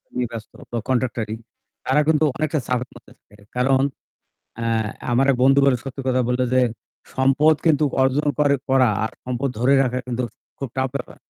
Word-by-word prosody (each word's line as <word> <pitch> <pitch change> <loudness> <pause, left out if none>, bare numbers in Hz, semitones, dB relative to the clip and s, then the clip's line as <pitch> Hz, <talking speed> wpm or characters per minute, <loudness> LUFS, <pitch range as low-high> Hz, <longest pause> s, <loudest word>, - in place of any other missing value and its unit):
নিয়ে 125 -1 0
ব্যস্ত 110 -2 -8 0.2
বা 120 - -2
কন্ট্রাক্টরি 120 -4 -1 0.5
তারা 140 +3 +3
কিন্তু 160 -1 +3
অনেকটা 155 0 0
চাপের 125 0 -1
মধ্যে - - -16
থাকে। 105 - -23 0.2
কারণ 130 +1 +3 0.8
অ্যা 115 0 -3 0.4
আমার 130 +3 +3
এক 130 - +1
বন্ধু 135 +1 +5
বলে 130 -3 +4
সত্যি 135 0 -6
কথা 130 0 +2
বলল 125 +1 0
যে, 130 - +4 0.5
সম্পদ 135 +4 +4
কিন্তু 155 -2 +4 0.2
অর্জন 135 +3 +2
করে 145 -1 +4
করা 130 -2 +4
আর 110 - -2
সম্পদ 125 +2 -2
ধরে 130 +3 +3
রাখা 125 0 -1
কিন্তু 125 0 -2 0.3
খুব 135 -3 -5
টাফ 130 0 +1
ব্যাপার। 130 -3 -5
130 Hz, 175 wpm, -22 LUFS, 125-140 Hz, 0.8 s, বন্ধু